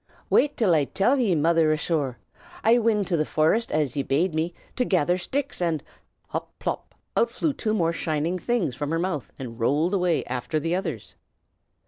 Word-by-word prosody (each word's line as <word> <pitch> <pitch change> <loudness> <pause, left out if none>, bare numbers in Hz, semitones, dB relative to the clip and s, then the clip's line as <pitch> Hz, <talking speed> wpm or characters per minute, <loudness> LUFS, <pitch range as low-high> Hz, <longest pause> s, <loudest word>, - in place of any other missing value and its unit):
"Wait 295 0 +3
till 205 -7 +3
I 150 -3 +3
till 240 - +2
ye, 210 -8 +2
mother 165 0 +3
asthore! 150 -5 -1 0.5
I 230 +2 +5
wint 215 -3 +1
to 175 - +2
the 155 - +2
forest 160 +10 +1
as 150 -5 0
ye 140 - +1
bade 155 +6 +1
me, 160 +2 0 0.2
to 255 - +1
gather 180 -6 +2
shticks, 270 +7 -2
an' 165 -4 0 0.2
" - - -45
hop! - - -5
pop! - - -4 0.2
out 470 - +3
flew 310 -3 -1
two 220 -5 -1
more 170 -4 +1
shining 165 +2 -1
things 215 - 0
from 145 +3 -3
her 165 - 0
mouth 170 -5 -2
and 120 -3 -7
rolled 150 - +2
away 180 -4 +2
after 130 +5 -2
the 165 +3 -1
others. 135 - -4
165 Hz, 190 wpm, -25 LUFS, 150-195 Hz, 0.5 s, I